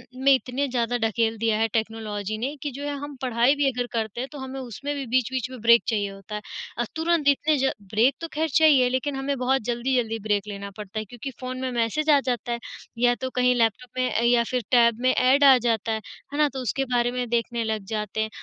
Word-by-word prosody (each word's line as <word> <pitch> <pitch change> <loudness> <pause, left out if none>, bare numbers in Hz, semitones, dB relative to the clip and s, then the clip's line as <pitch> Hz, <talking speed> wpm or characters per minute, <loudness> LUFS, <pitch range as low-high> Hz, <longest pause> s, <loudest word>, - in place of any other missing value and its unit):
में 270 +2 +4
इतने 265 +2 0
ज़्यादा 245 -1 0
ढकेल 225 0 0
दिया 225 -1 +1
है 225 - +3
टेक्नोलॉजी 215 -2 -2
ने 265 +6 -3
कि 290 -2 -3
जो 280 +3 -7
है 290 - -2
हम 290 0 -7
पढ़ाई 250 +2 +3
भी 285 -1 +1
अगर 245 0 -3
करते 225 0 -2
हैं, 265 - -5
तो 295 - -9
हमें 265 0 -6
उसमें 260 +4 -5
भी 275 - -4
बीच-बीच 255 +1 0
में 255 -2 -9
ब्रेक 235 0 +6
चाहिए 205 -3 0
होता 195 +2 -9
है। 210 - -4 0.4
अ, 240 - +1
तुरंत 325 -2 +1
इतने 295 +2 +3
ज 265 0 +2 0.2
ब्रेक 230 +6 +3
तो 330 - -3
खैर 315 +1 0
चाहिए 290 -6 +6
लेकिन 260 +3 -1
हमें 270 0 -2
बहुत 260 +1 +1
जल्दी-जल्दी 240 -1 0
ब्रेक 210 -1 -1
लेना 200 -1 -6
पड़ता 210 +1 -5
है 215 - -5
क्योंकि 245 +5 -8
फ़ोन 255 0 -5
में 260 -1 -2
मैसेज 240 +7 0
आ 290 - +7
जाता 240 -2 -2
है 235 - -2 0.4
या 245 0 +4
तो 260 - -2
कहीं 250 0 +3
लैपटॉप 230 +1 0
में 255 0 +1
अ, 230 - +1
या 235 0 +4
फिर 250 -1 0
टैब 235 -2 +4
में 255 0 +4
ऐड 265 +3 +4
आ 270 -2 +8
जाता 230 -2 0
है, 220 0 -2 0.3
है - - -3
ना? 300 -1 +4
तो 265 - -6
उसके 270 +3 -1
बारे 240 0 +2
में 250 0 -2
देखने 235 0 0
लग 220 -2 -2
जाते 215 0 -2
हैं, 220 - -1
245 Hz, 240 wpm, -25 LUFS, 225-265 Hz, 0.4 s, आ